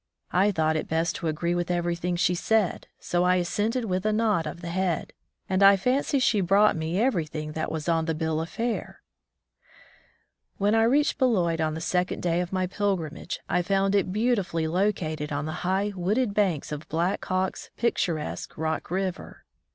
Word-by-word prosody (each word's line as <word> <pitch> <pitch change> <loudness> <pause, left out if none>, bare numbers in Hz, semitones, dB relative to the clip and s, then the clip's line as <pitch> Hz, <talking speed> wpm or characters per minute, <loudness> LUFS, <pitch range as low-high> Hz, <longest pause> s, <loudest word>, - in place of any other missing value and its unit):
I 195 +3 +3
thought 160 -3 +1
it 155 - -2
best 165 +1 0
to 170 - -3
agree 170 +2 -1
with 175 0 -1
everything 175 0 -1
she 180 +1 +2
said, 205 +2 0
so 175 0 0
I 180 0 +4
assented 215 +7 0
with 185 -2 -1
a 215 - +1
nod 210 -7 +1
of 170 - -7
the 170 - -5
head, 180 -2 -1 0.3
and 190 0 0
I 195 0 +8
fancy 260 +7 +1
she 230 -5 +2
brought 200 +4 +4
me 160 +2 -2
everything 155 - -1
that 155 +1 -3
was 160 0 -4
on 165 -1 +2
the 160 -1 -1
bill 160 0 -1
of 165 - -5
fare! 235 0 -3 1.5
When 205 +2 +2
I 225 0 +4
reached 285 +6 +2
Beloit 180 - +2
on 155 0 0
the 160 - -5
second 180 +2 -1
day 175 0 +1
of 180 - -4
my 185 -1 0
pilgrimage, 180 -5 -2
I 180 - +1
found 195 +2 +1
it 195 -2 +2
beautifully 200 -7 0
located 160 -4 -1
on 145 +1 -2
the 155 - -3
high, 195 +3 0
wooded 205 +5 0
banks 190 -10 0
of 150 +1 -6
Black 170 +4 0
Hawk's 185 0 -2
picturesque 170 -9 -2
Rock 160 0 -2
River. 185 +1 -4
180 Hz, 180 wpm, -26 LUFS, 165-200 Hz, 1.5 s, I